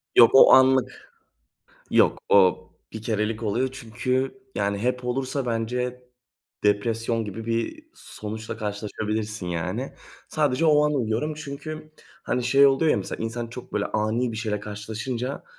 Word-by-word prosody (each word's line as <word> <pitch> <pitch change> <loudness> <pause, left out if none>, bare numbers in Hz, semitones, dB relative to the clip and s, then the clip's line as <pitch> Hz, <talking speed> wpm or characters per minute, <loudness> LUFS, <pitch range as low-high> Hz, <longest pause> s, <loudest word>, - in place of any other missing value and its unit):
Yok 115 - +8
o - - +9
anlık. 130 -1 +4 0.8
Yok - - +4
o 95 -3 +5 0.3
bir 110 -1 -7
kerelik 110 0 -1
oluyor. 120 +5 0
Çünkü, 130 - -2 0.2
yani, 100 0 -1
hep 125 +2 -1
olursa 130 +1 -2
bence 125 +2 -2 0.6
depresyon 115 +2 +1
gibi 110 +3 -7
bir 115 - -2
sonuçla 110 +1 -7
karşılaşabilirsin, 105 -1 -4
yani. 85 -2 -3 0.4
Sadece 150 +1 +1
o 150 -1 +5
an 150 - 0
uyuyorum 125 +5 -1
çünkü, 155 +1 -8 0.3
hani, 125 0 -1
şey 140 +3 +6
oluyor 145 +3 +3
ya - - +3
mesela 100 +3 -4
insan 115 +1 -3
çok 120 +2 -10
böyle 105 - 0
ani 110 +3 -1
bir - - -6
şeyle 105 -2 -2
karşılaşınca 110 +5 -5
115 Hz, 140 wpm, -25 LUFS, 110-130 Hz, 0.8 s, o